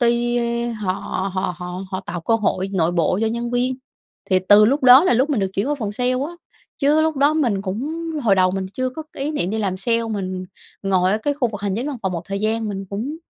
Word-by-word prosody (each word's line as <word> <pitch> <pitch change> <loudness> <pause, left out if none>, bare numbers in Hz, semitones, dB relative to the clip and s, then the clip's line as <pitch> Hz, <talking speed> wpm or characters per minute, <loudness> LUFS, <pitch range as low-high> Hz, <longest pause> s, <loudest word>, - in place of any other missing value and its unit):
ty, 240 0 +2
ơ, 235 0 -1
họ 210 -4 -2 0.4
họ 185 -1 -1
họ 180 +1 -6
họ 185 -1 -3
tạo 180 -3 -6
cơ 225 +7 +1
hội 195 -3 0
nội 170 -3 +1
bộ 175 +1 +1
cho 225 - +2
nhân 235 +2 -2
viên. 250 +1 0 0.5
Thì 185 - +5
từ 210 +1 +8
lúc 270 +7 +2
đó 255 +5 +8
là 365 - +3
lúc 260 +6 +2
mình 260 -7 +1
được 190 -1 -1
chuyển 200 +7 -1
qua 295 - +1
phòng 220 -7 -4
sale 250 +4 0
á, 275 +6 -2 0.5
chứ 295 +2 +3
lúc 315 -1 +1
đó 285 +3 +3
mình 235 -11 +1
cũng 250 - -4 0.2
hồi 215 -5 +4
đầu 185 -1 +3
mình 190 0 -3
chưa 255 +2 -2
có 315 +5 -7
ý 275 +2 -2
niệm 195 - -1
đi 220 - -2
làm 195 -4 -1
sale, 230 +4 0
mình 185 -3 -3 0.4
ngồi 190 -1 +2
ở 210 - +1
cái 285 +6 -1
khu 270 -4 0
vực 205 -3 -7
hành 200 -2 -1
chính 245 +5 -2
văn 290 -3 -3
phòng 190 -2 -1
một 170 -2 -3
thời 195 +1 -4
gian, 220 +1 0
mình 195 -1 -4
cũng 235 +10 -4
220 Hz, 255 wpm, -21 LUFS, 195-255 Hz, 0.5 s, từ